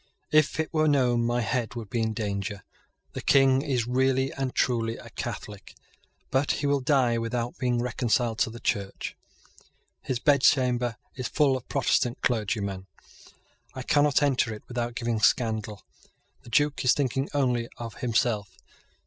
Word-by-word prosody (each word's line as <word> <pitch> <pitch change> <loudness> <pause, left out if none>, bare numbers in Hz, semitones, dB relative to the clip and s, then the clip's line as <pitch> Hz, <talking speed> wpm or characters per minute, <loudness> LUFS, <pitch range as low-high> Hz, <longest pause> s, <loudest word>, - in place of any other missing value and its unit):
If 155 0 +3
it 160 - -2
were 155 -1 +3
known, 125 -5 +3
my 120 +1 0
head 120 0 -2
would 115 -4 -7
be 120 - 0
in 110 -1 -1
danger. 100 -1 -3 0.5
The - - -5
King 135 -1 +4
is 130 -6 -1
really 130 +2 +1
and 135 -2 -3
truly 115 -2 0
a - - -12
Catholic; 105 -2 -7 0.6
but 135 +2 +2
he 145 - -3
will 140 0 +2
die 130 -4 +2
without 115 +1 -3
being 125 -2 +1
reconciled 120 -2 0
to 125 - +2
the 115 +1 -9
Church. 100 -4 -3 0.9
His 130 - -2
bedchamber 125 -4 +3 0.2
is 130 -2 -4
full 140 +2 +2
of 130 - -7
Protestant 120 0 0
clergymen. 100 -5 -1 0.9
I 130 - -5
cannot 145 +2 +3
enter 130 -5 +2
it 105 - -13
without 120 -1 -3
giving 115 -2 -1
scandal. 110 -2 +1 0.6
The - - -14
Duke 145 +3 +1
is 125 - +5
thinking 135 0 -1
only 125 -4 +1
of 115 -2 -7
himself. 110 -5 -1
120 Hz, 155 wpm, -27 LUFS, 115-135 Hz, 0.9 s, is